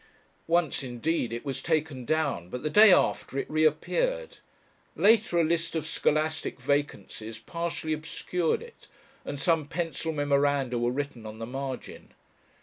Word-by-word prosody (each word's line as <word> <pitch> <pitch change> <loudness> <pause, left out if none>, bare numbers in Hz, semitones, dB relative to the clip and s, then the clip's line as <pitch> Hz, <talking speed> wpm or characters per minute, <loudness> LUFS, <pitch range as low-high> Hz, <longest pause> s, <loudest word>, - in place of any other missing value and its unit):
Once 170 -3 +2
indeed 125 +1 -1
it 115 +3 -5
was 135 -2 -3
taken 155 -6 -1
down, 140 - 0
but 125 +5 -6
the 155 - -1
day 210 +4 +8
after 140 - +2
it - - -1
reappeared. 475 - 0 0.6
Later 210 -4 +4
a - - +5
list 165 +1 0
of 160 -2 -1
scholastic 155 -2 0
vacancies 130 -5 -2
partially 165 +5 -3
obscured 160 - -1
it, 470 0 -15 0.4
and 145 - -5
some 160 -2 +2
pencil 165 +1 -2
memoranda 140 -4 +1
were 120 0 +1
written 130 -4 -4
on 110 0 -8
the 115 - -5
margin. 135 +2 -6
150 Hz, 145 wpm, -28 LUFS, 135-165 Hz, 0.6 s, day